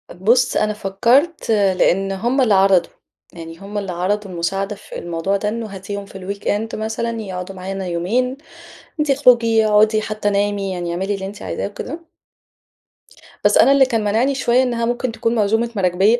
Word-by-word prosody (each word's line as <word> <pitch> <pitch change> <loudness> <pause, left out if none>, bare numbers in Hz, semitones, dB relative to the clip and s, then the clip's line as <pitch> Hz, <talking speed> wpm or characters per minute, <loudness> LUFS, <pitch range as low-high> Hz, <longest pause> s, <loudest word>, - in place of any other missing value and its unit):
بُص، 240 +7 +2
أنا 215 0 +1
فكّرت 235 - +1
لأن 195 -2 +2
هُم 240 +8 0
اللي 230 -5 +3
عرضوا، 190 -2 +4 0.4
يعني 165 0 -10
هُم 200 +1 -7
اللي 195 -2 -3
عرضوا 195 +3 -2
المساعدة 195 +4 -2
في 205 - -10
الموضوع 175 +4 -2
ده، 210 +1 -2
إنّه 230 0 -4
هاتيهم 200 +1 -6
في 195 - -11
الweekend 205 +3 -3
مثلًا 220 +2 -3
يقعدوا 185 -1 -6
معانا 190 0 -5
يومين، 235 +10 -1 0.6
وأنتِ 300 -2 0
اخرُجي 235 -5 +4
اقعدي 215 +1 +4
حتى 215 -1 -2
نامي 200 -1 0
يعني 175 -1 -3
أعملي 190 +4 -2
اللي 190 -1 -5
أنتِ 200 +2 -9
عايزاه - - -3
وكده. 255 +10 -7 1.4
بس - - +4
أنا 275 - +6
اللي 275 -1 +6
كان 230 -4 -1
مانِعني 230 +7 +1
شوية 250 0 +2
إنّها 235 -2 -1
ممكن 240 0 -1
تكون 230 +1 -1
م - - 0
عزومة 225 +3 +1
مراكبيَّة 195 +4 +2
205 Hz, 170 wpm, -19 LUFS, 195-230 Hz, 1.4 s, أنا